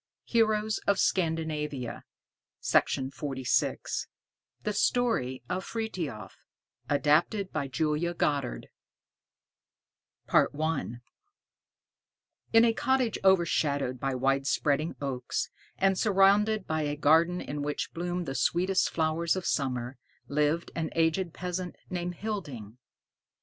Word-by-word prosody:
HEROES 215 Hz, -2 st, +1 dB
OF 200 Hz, -1 st, +4 dB
SCANDINAVIA 155 Hz, -8 st, -1 dB, 0.6 s
THE 135 Hz, -, -1 dB
STORY 205 Hz, -, +1 dB
OF 185 Hz, +1 st, -2 dB
FRITHIOF 180 Hz, -, -5 dB, 0.5 s
ADAPTED 150 Hz, -, +2 dB
BY 145 Hz, -3 st, -2 dB
JULIA 155 Hz, +5 st, -1 dB
GODDARD 140 Hz, -6 st, -1 dB, 1.6 s
I 155 Hz, 0 st, +2 dB, 1.7 s
In 225 Hz, +1 st, +7 dB
a 230 Hz, -, +3 dB
cottage 255 Hz, -1 st, +1 dB
overshadowed 150 Hz, -8 st, +2 dB
by 135 Hz, 0 st, -1 dB
wide 135 Hz, +2 st, +1 dB
spreading 150 Hz, +3 st, +1 dB
oaks, 130 Hz, -3 st, -3 dB, 0.3 s
and 195 Hz, 0 st, +3 dB
surrounded 210 Hz, +2 st, +3 dB
by 155 Hz, 0 st, -1 dB
a 145 Hz, -1 st, -1 dB
garden 165 Hz, +4 st, +4 dB
in 145 Hz, -3 st, -5 dB
which 145 Hz, 0 st, -3 dB
bloomed 175 Hz, +1 st, -3 dB
the 135 Hz, -, -3 dB
sweetest 180 Hz, +8 st, +2 dB
flowers 160 Hz, +1 st, +1 dB
of 185 Hz, -, -4 dB
summer, 125 Hz, -2 st, -1 dB, 0.3 s
lived 150 Hz, +3 st, 0 dB
an 165 Hz, -1 st, -2 dB
aged 165 Hz, +2 st, +1 dB
peasant 180 Hz, +1 st, -4 dB, 0.2 s
named 175 Hz, -1 st, -3 dB
Hilding. 140 Hz, -, -5 dB
160 Hz, 100 wpm, -29 LUFS, 140-190 Hz, 1.7 s, In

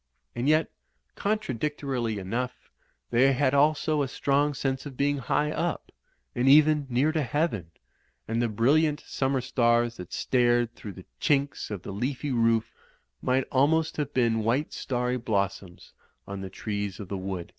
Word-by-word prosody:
And 125 Hz, +4 st, -1 dB
yet, 155 Hz, +1 st, +3 dB, 0.4 s
contradictorily 140 Hz, -, -2 dB
enough, 125 Hz, +6 st, -4 dB, 0.4 s
they 130 Hz, +3 st, +4 dB
had 130 Hz, 0 st, +1 dB
also 150 Hz, +1 st, +3 dB
a 140 Hz, -, 0 dB
strong 140 Hz, +2 st, +1 dB
sense 135 Hz, +1 st, -2 dB
of 135 Hz, -3 st, -10 dB
being 145 Hz, 0 st, +1 dB
high 150 Hz, +3 st, 0 dB
up; 170 Hz, +2 st, -3 dB, 0.4 s
and 125 Hz, +2 st, +2 dB
even 150 Hz, 0 st, +5 dB
near 130 Hz, +6 st, +2 dB
to 155 Hz, -1 st, 0 dB
heaven; 130 Hz, -, -1 dB, 0.6 s
and 115 Hz, +1 st, 0 dB
the 120 Hz, -, +1 dB
brilliant 145 Hz, +8 st, +2 dB
summer 135 Hz, -1 st, -1 dB
stars 120 Hz, -2 st, +1 dB
that 90 Hz, -1 st, -9 dB
stared 120 Hz, -2 st, +2 dB
through 105 Hz, -4 st, -9 dB
the 95 Hz, -, -12 dB
chinks 140 Hz, -2 st, 0 dB
of 100 Hz, -4 st, -5 dB
the -, -, -6 dB
leafy 130 Hz, +6 st, -2 dB
roof 115 Hz, -2 st, +2 dB, 0.5 s
might 130 Hz, +1 st, +1 dB
almost 160 Hz, +4 st, +2 dB
have 145 Hz, -2 st, -2 dB
been 115 Hz, -4 st, +1 dB
white 125 Hz, +7 st, 0 dB
starry 125 Hz, -1 st, -1 dB
blossoms 100 Hz, -5 st, -3 dB, 0.3 s
on 100 Hz, -1 st, -6 dB
the 95 Hz, -, -6 dB
trees 100 Hz, -1 st, -4 dB
of 100 Hz, -, -7 dB
the 100 Hz, -, -4 dB
wood. 95 Hz, -2 st, -5 dB
125 Hz, 155 wpm, -27 LUFS, 115-145 Hz, 0.6 s, even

